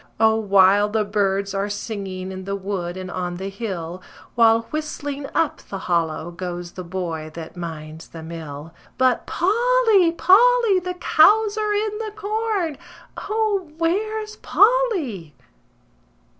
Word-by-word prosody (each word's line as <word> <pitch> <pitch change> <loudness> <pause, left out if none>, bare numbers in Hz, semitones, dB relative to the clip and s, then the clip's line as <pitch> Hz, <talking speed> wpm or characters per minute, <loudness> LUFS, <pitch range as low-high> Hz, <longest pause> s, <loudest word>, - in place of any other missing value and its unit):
O, 220 0 +5
wild 205 -1 +4
the 220 -1 +1
birds 200 -1 0
are 200 +1 -1
singing 195 -3 -5
in 185 0 -7
the 200 0 -2
wood 185 -3 -4
and 185 -1 -6
on 180 -1 -3
the 190 +2 -5
hill, 185 -5 -5 0.3
While 230 -1 +5
whistling 290 -2 -4
up 325 - +1
the 195 - -4
hollow 170 -2 -1
goes 175 0 -6
the 185 - -7
boy 170 -3 -4
that 165 0 -8
minds 160 -2 -7
the 165 -1 -10
mill. 160 -1 -8 0.2
But 255 -2 +2
Polly! 445 -2 +3
Polly! 450 +3 +5
The 360 0 -5
cows 410 +5 +4
are 425 -1 0
in 425 0 -1
the 435 -2 -5
corn! 425 -7 -2 0.5
O, 420 -5 0
where's 425 +6 -1
Polly? 365 - +1
215 Hz, 135 wpm, -22 LUFS, -, 0.5 s, O